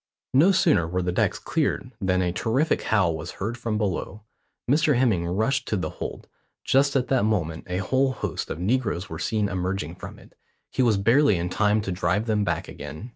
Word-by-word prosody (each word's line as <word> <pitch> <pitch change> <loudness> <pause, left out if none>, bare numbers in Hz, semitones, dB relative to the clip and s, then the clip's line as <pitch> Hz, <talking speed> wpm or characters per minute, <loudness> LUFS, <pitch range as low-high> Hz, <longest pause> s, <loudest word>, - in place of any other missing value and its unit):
No 155 +9 +6
sooner 160 - +3
were 90 +2 -1
the 90 - 0
decks 90 - +1
cleared - - -1
than 95 -1 +1
a 90 - 0
terrific 115 - 0
howl 95 -7 +2
was 80 +3 -6
heard 110 +5 -4
from 115 -3 -2
below. 105 0 -3 0.4
Mr 150 +2 +3
Hemming 105 -10 +2
rushed 110 +10 0
to 105 - 0
the 90 - -3
hold; - - -7 0.4
just 140 +1 +2
at 130 -2 +1
that 130 -5 +2
moment 85 -7 -1
a 90 - -1
whole 130 +7 +1
host - - -4
of - - -4
negroes 105 -1 -1
were - - -5
seen 110 -2 0
emerging 90 -3 -3
from - - -9
it. - - -18 0.4
He - - 0
was 115 -5 +3
barely 115 +1 +4
in 85 +1 -2
time 105 +3 +2
to 95 - -4
drive 100 +4 0
them 105 -2 +1
back - - -2
again. 105 +11 -8
105 Hz, 200 wpm, -25 LUFS, 90-125 Hz, 0.4 s, No